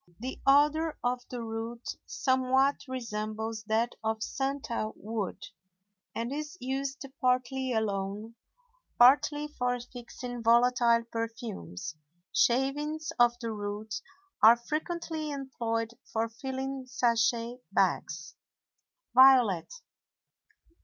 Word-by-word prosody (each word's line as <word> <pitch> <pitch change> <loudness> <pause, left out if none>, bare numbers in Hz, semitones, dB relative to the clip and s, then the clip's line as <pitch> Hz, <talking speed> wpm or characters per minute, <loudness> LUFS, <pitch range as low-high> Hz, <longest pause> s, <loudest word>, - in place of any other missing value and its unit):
The 255 +3 -6
odor 300 +3 +4
of 245 0 0
the 245 -2 -5
root 225 +1 -5 0.2
somewhat 260 +2 +2
resembles 220 -3 -4
that 225 +2 +1
of 220 0 -1
santal 270 -5 -2
wood, 215 -2 -4 0.7
and 235 +3 -2
is 300 +3 -5
used 270 +2 -3 0.2
partly 255 0 +1
alone, 210 0 -2 0.6
partly 290 +4 +5
for 250 -4 -1
fixing 245 0 -8
volatile 235 0 +4
perfumes. 225 - -5 0.4
Shavings 295 +5 +1
of 240 0 +5
the 230 -1 -3
root 210 0 -5 0.5
are 230 +2 +9
frequently 315 +4 -3
employed 235 -5 -2 0.2
for 225 +1 0
filling 265 +2 -5
sachet 235 -1 +1
bags. 170 -3 0 0.8
VIOLET. 255 -9 +6
240 Hz, 95 wpm, -30 LUFS, 225-265 Hz, 0.8 s, are